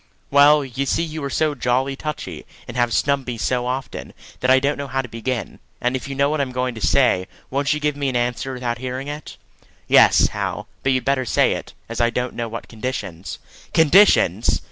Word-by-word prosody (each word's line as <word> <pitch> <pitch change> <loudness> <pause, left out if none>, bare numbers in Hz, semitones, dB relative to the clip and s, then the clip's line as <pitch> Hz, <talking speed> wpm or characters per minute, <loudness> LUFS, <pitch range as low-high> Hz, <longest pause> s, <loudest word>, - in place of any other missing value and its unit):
"Well, 145 +1 +6
you 135 +2 -3
see 165 - +1
you 160 -2 -5
are 140 - -2
so 155 +1 +1
jolly 130 +1 0
touchy, 150 +2 -6 0.2
and 120 - -8
have 120 -1 +1
snubbed 140 +2 +1
me 120 -2 -3
so 125 +2 -1
often, 130 +1 -5 0.3
that 125 - 0
I 130 0 +6
don't 140 +2 -1
know 140 - -4
how 135 0 -1
to - - -7
begin; 115 +1 -4 0.2
and 125 +1 0
if 130 - -4
you 135 - -5
know 140 +1 +3
what 150 0 0
I'm 135 -2 -2
going 125 0 -2
to 110 - -9
say, 100 -10 +3 0.2
won't 140 +1 0
you 150 - +1
give 150 -1 0
me 140 -1 -1
an 130 - -4
answer 125 +2 -1
without 125 -2 -3
hearing 130 +2 -4
it?" 150 +1 -7 0.5
"Yes, - - +6
Hal; - - -4
but 135 - +1
you'd 130 -1 0
better 140 -1 +1
say - - +3
it, - - -7
as 115 +1 -3
I 120 - +4
don't 125 +1 -2
know 115 -1 -4
what 115 +1 -7
conditions 110 -7 -5 0.2
" - - -22
"Conditions!" 165 +6 +5
130 Hz, 220 wpm, -21 LUFS, 125-140 Hz, 0.5 s, Well